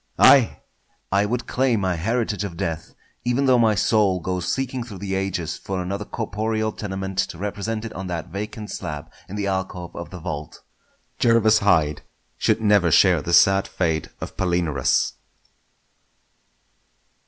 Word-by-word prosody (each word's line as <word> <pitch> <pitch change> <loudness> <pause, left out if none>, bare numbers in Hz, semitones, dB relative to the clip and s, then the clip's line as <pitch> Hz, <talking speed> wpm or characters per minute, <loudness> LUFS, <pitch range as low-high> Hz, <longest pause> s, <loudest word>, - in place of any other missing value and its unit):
Aye! 130 -5 +6 0.5
I 100 +2 +3
would 120 +3 -2
claim 125 -5 +1
my 95 -1 +1
heritage 105 +3 -1
of 90 -5 -6
death, 80 -1 -4 0.3
even 125 +3 +1
though 130 -2 +5
my 110 -2 +4
soul 100 -1 +2
go 90 +2 -2
seeking 125 +8 -2
through 110 -5 -9
the 95 0 -4
ages 95 -4 -2
for 95 -1 -4
another 100 +3 -3
corporeal 110 0 -2
tenement 95 -2 -4
to - - -1
represent 105 +3 -3
it 115 - -6
on 95 0 -6
that 85 -2 -4
vacant 105 +3 -6
slab 80 -2 -6 0.2
in 100 - -6
the 105 -1 -2
alcove 95 -2 -3
of 85 - -6
the 90 - -8
vault. 75 -4 -6 0.6
Jervas 115 -2 +4
Hyde 75 -7 +2 0.4
should - - +2
never 105 -5 +4
share 85 0 +5
the 85 - -4
sad 95 +2 +5
fate 80 -4 -1
of - - -7
Palinurus! 85 -7 +1
95 Hz, 155 wpm, -23 LUFS, 85-110 Hz, 0.6 s, Aye